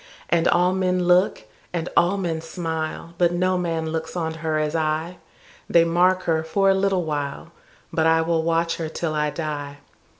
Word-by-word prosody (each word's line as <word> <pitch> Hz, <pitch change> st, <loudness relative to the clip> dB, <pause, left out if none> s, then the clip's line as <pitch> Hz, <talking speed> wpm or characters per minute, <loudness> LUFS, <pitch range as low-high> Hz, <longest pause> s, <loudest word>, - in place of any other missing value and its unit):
And 170 Hz, -1 st, +2 dB
all 180 Hz, +1 st, +3 dB
men 185 Hz, -1 st, +1 dB
look, 180 Hz, -, +3 dB, 0.3 s
and 170 Hz, -1 st, -3 dB
all 175 Hz, +4 st, +3 dB
men 170 Hz, -4 st, -2 dB
smile, 165 Hz, 0 st, -4 dB
But 175 Hz, -1 st, +3 dB
no 185 Hz, +1 st, +1 dB
man 165 Hz, -3 st, -2 dB
looks 160 Hz, +1 st, -4 dB
on 160 Hz, -2 st, -2 dB
her 160 Hz, -1 st, 0 dB
as 155 Hz, +1 st, -1 dB
I:They 160 Hz, +1 st, -1 dB
mark 180 Hz, +2 st, +2 dB
her 160 Hz, -1 st, +1 dB
for 195 Hz, +4 st, +2 dB
a -, -, +4 dB
little 190 Hz, -1 st, +1 dB
while, 145 Hz, -3 st, -4 dB, 0.4 s
But 160 Hz, 0 st, +2 dB
I 160 Hz, 0 st, +4 dB
will 165 Hz, 0 st, +1 dB
watch 165 Hz, +1 st, 0 dB
her 160 Hz, -2 st, -3 dB
till 160 Hz, 0 st, -3 dB
I 150 Hz, -1 st, 0 dB
die. 145 Hz, -2 st, -5 dB
165 Hz, 175 wpm, -23 LUFS, 160-180 Hz, 0.4 s, a